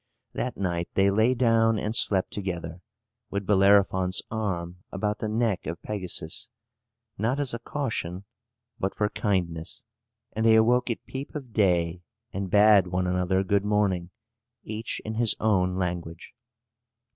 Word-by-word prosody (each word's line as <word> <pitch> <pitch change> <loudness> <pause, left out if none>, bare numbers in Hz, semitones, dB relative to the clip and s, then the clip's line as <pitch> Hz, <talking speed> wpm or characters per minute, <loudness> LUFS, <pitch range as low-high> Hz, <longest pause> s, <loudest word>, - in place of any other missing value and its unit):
That 125 - -3
night 85 -3 -2
they 100 0 +4
lay 110 +5 +3
down 115 -2 +3
and 105 +2 -2
slept 95 -5 +3
together, 90 -4 -4 0.5
with 100 -1 -3
Bellerophon's 95 -2 +3
arm 90 -6 -3
about 105 +1 -2
the 110 - -2
neck 110 -5 0
of 85 +1 -4
Pegasus, 90 -2 -4 0.7
not 120 +6 0
as 140 -4 0
a 115 - -3
caution, 110 - -4 0.5
but 95 - -2
for 105 -1 0
kindness. 90 -5 -2 0.5
And 110 - -1
they 110 0 +6
awoke 120 +3 +3
at 115 - -3
peep 135 +3 -7
of 130 -6 -7
day, 90 -4 +2 0.3
and 95 0 -3
bade 105 -1 +6
one 90 +1 -1
another 90 +1 +1
good 100 +1 +1
morning, 100 -4 +1 0.5
each 110 +1 -4
in 110 - -3
his 115 0 +2
own 95 -4 +2
language. 85 -2 -4
100 Hz, 145 wpm, -26 LUFS, 90-110 Hz, 0.7 s, they